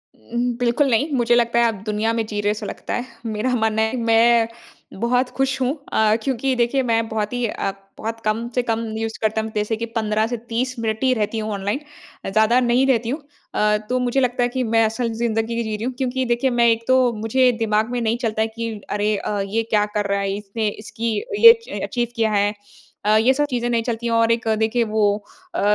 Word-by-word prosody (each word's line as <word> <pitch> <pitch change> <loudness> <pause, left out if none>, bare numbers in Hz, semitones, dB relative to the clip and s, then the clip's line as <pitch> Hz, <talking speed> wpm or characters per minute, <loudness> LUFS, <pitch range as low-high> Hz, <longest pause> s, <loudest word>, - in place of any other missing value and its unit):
उम, 240 +1 -2
बिल्कुल 245 +3 +2
नहीं। 260 +6 +2
मुझे 240 -2 +3
लगता 235 0 +2
है 235 - +4
आप 230 - +2
दुनिया 215 +1 0
में 225 -1 -1
जी 210 -1 -4
रहे 205 - +1
है - - +3
ऐसा 210 - -5
लगता - - -5
है। 245 - -2 0.2
मेरा 225 +3 -1
मानना 220 -1 +1
है 220 0 +1
कि - - -3
मैं 230 0 +4 0.5
बहुत 245 +3 +1
खुश 270 0 0
हूँ। 255 +1 +1 0.2
अ, 215 0 +4
क्योंकि 265 0 0
देखिए 245 +3 +1
मैं 230 -2 +1
बहुत 215 0 -2
ही 245 -1 0
अ, 195 - -2 0.3
बहुत 225 +1 -4
कम 220 +2 0
से 250 - +3
कम 230 -1 -1 0.2
यूज़ 225 0 -3
करता 220 0 +1
हूँ। 220 0 -5
जैसे 210 +1 0
कि 230 - -3
15 215 -1 +1
से 240 +1 -3
30 250 +2 -1
मिनट 220 +1 -2
ही 260 -1 +4
रहती 220 -1 -1
हूँ 215 0 -3
ऑनलाइन 200 +5 -2 0.5
अ, - - -2
ज़्यादा 220 +5 +4
नहीं 245 +1 +3
रहती 235 -3 +1
हूँ। 290 +5 -3 0.3
अ, 210 0 +2
तो 255 0 +1
मुझे 250 +1 +1
लगता 250 -1 +1
है 245 - +1
कि 255 +1 -2
मैं 225 -1 +3
असल 225 +2 -1
ज़िंदगी 230 0 -1
जी 220 -1 -3
रही 210 - -6
हूँ। 255 +2 -2
क्योंकि 260 0 -1
देखिए, 240 +2 +1
मैं 240 -1 +3
एक 230 0 +1
तो 260 -1 +4
मुझे 230 +4 +2
दिमाग 220 0 +1
में 245 -1 -1
नहीं 230 +1 0
चलता 225 -3 -1
है 220 - +2
कि 230 +1 -5 0.2
अरे 210 +1 0
अ, 205 +1 -3
ये 220 +3 -1
क्या 210 -1 +3
कर 205 -1 +1
रहा 200 0 +1
है? 195 0 -1
इसने 210 +2 -3
इसकी 220 +2 -4 0.2
ये 460 0 +11
च - - -5
अचीव 240 -1 -1
किया 225 -1 +1
है। 205 0 +2 0.5
अ, 210 +1 +4
ये 235 +4 +4
सब 295 +2 +1
चीज़ें 240 -2 -1
नहीं 230 -1 +1
चलती 235 0 -3
हैं 230 - 0
और 230 0 +3
एक 230 0 0
देखिए 225 +2 +2
वो 215 -1 0 0.5
अ, - - 0
230 Hz, 240 wpm, -21 LUFS, 220-245 Hz, 0.5 s, ये